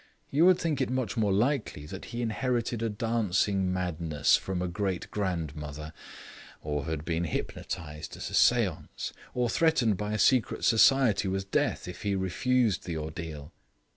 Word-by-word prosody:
You 155 Hz, +6 st, +5 dB
would 185 Hz, -1 st, +6 dB
think 160 Hz, -6 st, -1 dB
it -, -, 0 dB
much 130 Hz, -5 st, -1 dB
more 105 Hz, -4 st, +1 dB
likely 110 Hz, -, 0 dB
that -, -, -8 dB
he 120 Hz, +1 st, -4 dB
inherited 120 Hz, 0 st, -1 dB
a 115 Hz, -, 0 dB
dancing 100 Hz, -3 st, 0 dB
madness 85 Hz, -5 st, +1 dB
from 95 Hz, -2 st, -2 dB
a 90 Hz, -, -1 dB
great 90 Hz, +1 st, -3 dB
grandmother; 75 Hz, -5 st, -4 dB, 0.7 s
or 75 Hz, -2 st, -2 dB
had 80 Hz, -1 st, -3 dB
been 85 Hz, 0 st, -1 dB
hypnotised 75 Hz, -1 st, -5 dB
at -, -, -5 dB
a -, -, -10 dB
seance; -, -, +2 dB, 0.2 s
or 125 Hz, -1 st, +1 dB
threatened 125 Hz, -, +2 dB
by 105 Hz, +1 st, -3 dB
a -, -, 0 dB
secret 125 Hz, +1 st, +2 dB
society 115 Hz, -4 st, +4 dB
with 95 Hz, +1 st, -3 dB
death -, -, 0 dB
if 90 Hz, -, -8 dB
he 100 Hz, -2 st, 0 dB
refused 105 Hz, +4 st, +1 dB
the 85 Hz, -3 st, -3 dB
ordeal. 80 Hz, -1 st, -6 dB
95 Hz, 160 wpm, -29 LUFS, 80-115 Hz, 0.7 s, would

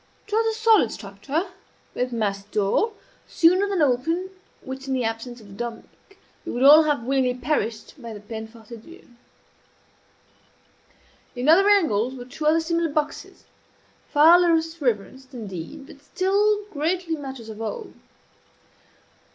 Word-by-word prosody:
It 420 Hz, -, -11 dB
was 445 Hz, 0 st, +1 dB
a -, -, -9 dB
solid 440 Hz, -, +4 dB
structure, 270 Hz, -, -4 dB, 0.4 s
with 250 Hz, 0 st, -2 dB
massy 200 Hz, -4 st, -2 dB
door, 215 Hz, -, +1 dB, 0.3 s
sooner 365 Hz, +4 st, +3 dB
than 380 Hz, -6 st, +1 dB
open 325 Hz, +8 st, 0 dB, 0.3 s
which 265 Hz, +1 st, -7 dB
in 265 Hz, -, -1 dB
the 255 Hz, -, -1 dB
absence 225 Hz, +2 st, -4 dB
of 215 Hz, -, -15 dB
the -, -, -12 dB
"Dominie" 235 Hz, +2 st, -6 dB, 0.6 s
we -, -, -5 dB
would 245 Hz, -, -1 dB
all 295 Hz, +3 st, +9 dB
have 290 Hz, -6 st, 0 dB
willingly 260 Hz, 0 st, +1 dB
perished 250 Hz, -1 st, -3 dB
by 235 Hz, -1 st, -8 dB
the 210 Hz, -, -8 dB
peine 220 Hz, +1 st, -7 dB
forte 225 Hz, 0 st, -18 dB
et -, -, -15 dB
dure. 340 Hz, +7 st, -15 dB, 2.3 s
In 250 Hz, +2 st, -3 dB
other 380 Hz, +6 st, +6 dB
angles 265 Hz, -, +2 dB
were 245 Hz, -1 st, -8 dB
two 300 Hz, +5 st, -4 dB
other 320 Hz, +2 st, +4 dB
similar 335 Hz, 0 st, 0 dB
boxes, 300 Hz, 0 st, -4 dB, 0.6 s
far 320 Hz, +4 st, +7 dB
less 325 Hz, -1 st, +1 dB
reverenced, 260 Hz, +2 st, -3 dB
indeed, 215 Hz, -, -7 dB
but 280 Hz, -, -15 dB
still 405 Hz, +6 st, +1 dB
greatly 330 Hz, +3 st, -1 dB
matters 265 Hz, -6 st, -8 dB
of 220 Hz, 0 st, -8 dB
awe. 435 Hz, -, -4 dB
275 Hz, 150 wpm, -24 LUFS, 230-335 Hz, 2.3 s, all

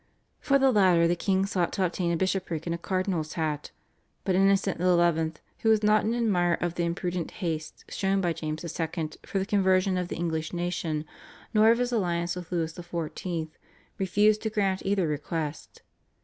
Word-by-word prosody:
For 275 Hz, -, +3 dB
the 270 Hz, -1 st, +4 dB
latter 185 Hz, -6 st, +5 dB
the 175 Hz, -, +2 dB
king 190 Hz, +2 st, +1 dB
sought 180 Hz, -3 st, 0 dB
to 190 Hz, -, +1 dB
obtain 175 Hz, 0 st, -1 dB
a 170 Hz, -, +1 dB
bishopric 185 Hz, -3 st, -1 dB
and 170 Hz, -, -1 dB
a 170 Hz, -, -4 dB
cardinal's 185 Hz, -4 st, -1 dB
hat, 155 Hz, -3 st, -2 dB, 0.5 s
but 190 Hz, -, +1 dB
Innocent 195 Hz, -1 st, +3 dB
XI., 170 Hz, -3 st, +2 dB, 0.2 s
who 225 Hz, -, +1 dB
was 220 Hz, -1 st, +4 dB
not 210 Hz, 0 st, +4 dB
an 225 Hz, +2 st, +1 dB
admirer 180 Hz, -7 st, +2 dB
of 175 Hz, -1 st, -2 dB
the 170 Hz, 0 st, -1 dB
imprudent 175 Hz, 0 st, -2 dB
haste 160 Hz, -5 st, -5 dB
shown 195 Hz, 0 st, 0 dB
by 175 Hz, -3 st, +1 dB
James 155 Hz, 0 st, -4 dB
II. 165 Hz, -1 st, -3 dB, 0.2 s
for -, -, -2 dB
the 190 Hz, -, 0 dB
conversion 190 Hz, -2 st, +2 dB
of 180 Hz, -, -2 dB
the -, -, -5 dB
English 160 Hz, -1 st, -2 dB
nation, 170 Hz, -3 st, -2 dB, 0.5 s
nor 215 Hz, 0 st, +6 dB
of 230 Hz, -, +5 dB
his 245 Hz, 0 st, 0 dB
alliance 175 Hz, -6 st, 0 dB
with 180 Hz, -1 st, -8 dB
Louis 165 Hz, -2 st, -1 dB
XIV., 170 Hz, -1 st, -4 dB, 0.5 s
refused 205 Hz, +3 st, +3 dB
to 220 Hz, -, -1 dB
grant 195 Hz, -3 st, 0 dB
either 195 Hz, -3 st, +1 dB
request. 150 Hz, +1 st, -4 dB
175 Hz, 180 wpm, -27 LUFS, 165-195 Hz, 0.5 s, nor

